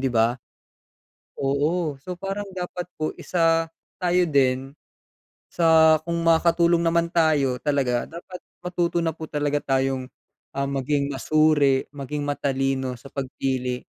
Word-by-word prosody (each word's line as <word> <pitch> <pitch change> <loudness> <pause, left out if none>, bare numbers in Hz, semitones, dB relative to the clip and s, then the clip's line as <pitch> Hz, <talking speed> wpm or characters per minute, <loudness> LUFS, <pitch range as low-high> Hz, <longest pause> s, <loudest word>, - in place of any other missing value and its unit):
di 135 - +1
ba? 115 +2 +2 1.0
Oo, 145 +2 0
so, 180 +6 -6
parang 195 +3 -4
dapat 180 -1 -5
po 155 0 -2
isa 165 -2 +2 0.3
tayo 180 -1 +2
din 135 -2 +1 0.8
sa 160 -2 +5
kung 170 0 -2
makakatulong 170 +1 +3
naman 170 0 +2
tayo 145 -7 +2
talaga 130 -4 0
dapat 175 +2 -9 0.2
matuto 175 -1 0
na 165 - 0
po 160 -1 -8
talaga 145 -1 0 0.2
tayong, 130 -1 -1 0.5
ah, 140 - 0
maging 140 +1 -1
masuri 145 -2 +3
maging 145 +1 -4
matalino 135 -2 -1
sa 125 - -15
pagpili 130 -2 -3
145 Hz, 125 wpm, -24 LUFS, 135-170 Hz, 1.0 s, sa